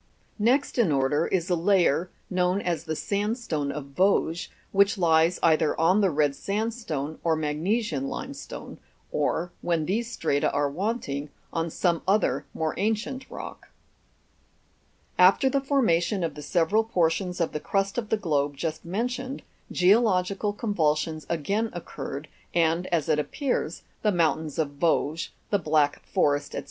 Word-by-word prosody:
Next 250 +5 +2
in 205 -9 +4
order 140 +3 +2
is 180 -2 0
a - - +4
layer, 175 -2 +2 0.2
known 180 +1 +1
as 170 -4 -2
the 160 -1 -2
sandstone 200 - -1
of 140 -1 -7
Vosges, 180 -2 +2 0.2
which 200 +3 +4
lies 165 0 +3
either 160 -2 +3
on 180 +6 +4
the 195 - +4
red 145 -3 +1
sandstone 195 - -3
or 165 -1 +2
magnesian 155 - -1
limestone; - - -7 0.3
or, 175 +1 0
when 165 -3 0
these 230 +7 -1
strata 145 -9 0
are 145 0 0
wanting, 155 - -2 0.2
on 165 0 -1
some 170 0 0
other 205 +3 +2
more 160 -1 -1
ancient 225 +6 -2
rock. - - -9 1.5
After 190 +9 +6
the 275 - +1
formation 210 - +2
of 165 - -1
the 150 - -9
several 175 +8 +2
portions 180 -3 0
of 170 - 0
the 150 - -3
crust 195 +6 0
of 220 -3 -6
the 220 - +2
globe 145 -7 0
just 160 +2 -3
mentioned, 250 +8 -3 0.3
geological 195 0 +3
convulsions 160 -7 -1
again 200 +8 0
occurred, 155 -4 -6 0.3
and, 170 +1 +2
as 165 -4 0
it 150 - +2
appears, 270 - -2 0.2
the 210 - +2
mountains 160 -4 0
of 145 -3 -2
Vosges, 165 0 +1 0.2
the 205 - +3
Black 150 -3 +1
Forest, 145 0 +1
&c. - - -2
175 Hz, 145 wpm, -26 LUFS, 155-205 Hz, 1.5 s, After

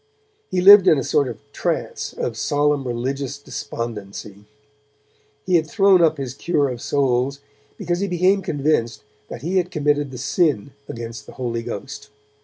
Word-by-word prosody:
He 180 - 0
lived 195 0 +9
in 155 - +6
a 135 - -1
sort 140 -2 +1
of 120 - -6 0.2
trance - - -3
of - - -4
solemn 145 -2 0
religious 135 +3 -3
despondency. 105 -6 -7 1.0
He 180 -2 +4
had 160 -2 -2
thrown 195 -2 +4
up 160 -2 +3
his 135 -3 -4
cure 145 -1 0
of 120 -2 -6
souls, 135 0 0 0.4
because 175 0 -2
he 200 - -1
became 185 +2 +2
convinced 145 -8 -1 0.2
that 120 - -9
he 180 +4 0
had 180 -1 +1
committed 145 -4 0
the 130 - -8
Sin 140 - 0 0.2
against 115 -2 -7
the - - -11
Holy 120 -3 -3
Ghost. 135 +4 -7
140 Hz, 160 wpm, -21 LUFS, 120-170 Hz, 1.0 s, lived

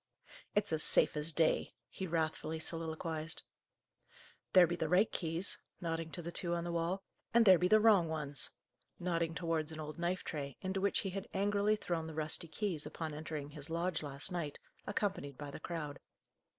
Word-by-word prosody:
"It's 205 -4 +2
as 155 - +1
safe - - +6
as 150 +2 +1
day," 160 0 +2
he 190 - -5
wrathfully 160 -1 -1
soliloquized. 160 0 -3 1.1
"There 185 -2 +9
be 175 +1 -1
the 160 -2 -2
right 185 +5 +4
keys," 165 +2 -1 0.2
nodding 165 -2 -2
to 175 - -1
the 170 - -4
two 175 0 0
on 170 - -2
the 175 - -3
wall, 170 +3 -1 0.3
"and 235 -1 +7
there 185 -4 +8
be 180 - +3
the 215 +3 +6
wrong 210 -6 +6
ones," 150 -3 0 0.5
nodding 170 -2 0
towards 165 -3 -1
an 155 - -7
old 155 +1 -6
knife 175 +2 -1
tray, 140 -4 -5
into 190 0 -2
which 200 0 +2
he 195 - -3
had 195 +1 -5
angrily 205 +2 +2
thrown 170 -6 -2
the 160 - -7
rusty 155 +2 -1
keys, 165 -4 -2
upon 155 0 -5
entering 150 -1 -5
his 145 0 -7
lodge 170 0 0
last 145 +4 -2
night, 165 -5 -3 0.3
accompanied 195 -10 -2
by 145 -1 -6
the - - -7
crowd. 155 -4 -5
165 Hz, 185 wpm, -35 LUFS, 155-185 Hz, 1.1 s, There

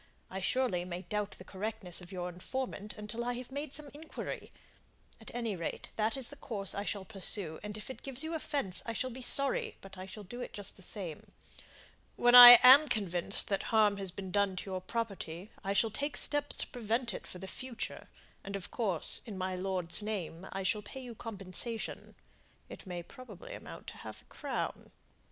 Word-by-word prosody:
I, 190 - -3
surely, 195 -3 +1
may 180 0 -5
doubt 210 +2 -2
the - - -11
correctness 195 -2 -4
of 180 - -12
your 180 -2 -3
information 210 +3 -4
until 210 +3 -4
I 245 +1 -1
have 250 +1 -7
made 285 +1 -4
some 290 -1 -3
inquiry; 310 +2 -7 0.7
at - - -10
any 230 -4 -2
rate, 170 -2 -4
that 220 +4 0
is 260 -3 +5
the 285 - -8
course 205 -8 -3
I 200 - -2
shall 200 -3 -2
pursue, 190 -4 -1
and 210 0 -5
if 215 - -8
it - - -10
gives 270 +1 -3
you 320 +1 -3
offence, 285 - 0
I 230 - -2
shall 255 +3 -2
be 255 +2 -8
sorry, 275 +2 +1
but 195 -1 -12
I 185 - -7
shall 205 +2 -9
do 240 +6 -8
it - - -6
just 205 -1 -2
the - - -15
same. 180 -4 -5 0.8
When 240 0 +4
I 245 0 +14
am 275 +4 +10
convinced 195 -5 +1
that 195 -1 +1
harm 210 -2 +4
has 195 -1 -4
been 185 +1 -7
done 200 -1 +2
to 190 +2 -5
your 185 0 -2
property, 195 -3 -4
I 195 - 0
shall 220 +2 +2
take 285 +6 -1
steps 290 -1 +3
to - - -2
prevent 235 +1 -1
it - - -7
for - - -9
the 190 +1 -7
future, 255 +3 -6 0.3
and 200 0 -5
of 195 -2 -5
course, 195 -8 +1
in 205 -4 -6
my 185 0 -2
lord's 185 -1 +1
name, 190 -4 -4
I 195 0 -3
shall 210 +3 +1
pay 265 +5 -8
you 245 -2 -8
compensation 220 +1 -3 0.5
it - - -10
may 175 -1 -5
probably 255 - -11
amount - - -9
to - - -12
half - - -9
a - - -31
crown." - - -4
210 Hz, 200 wpm, -33 LUFS, 185-245 Hz, 0.8 s, I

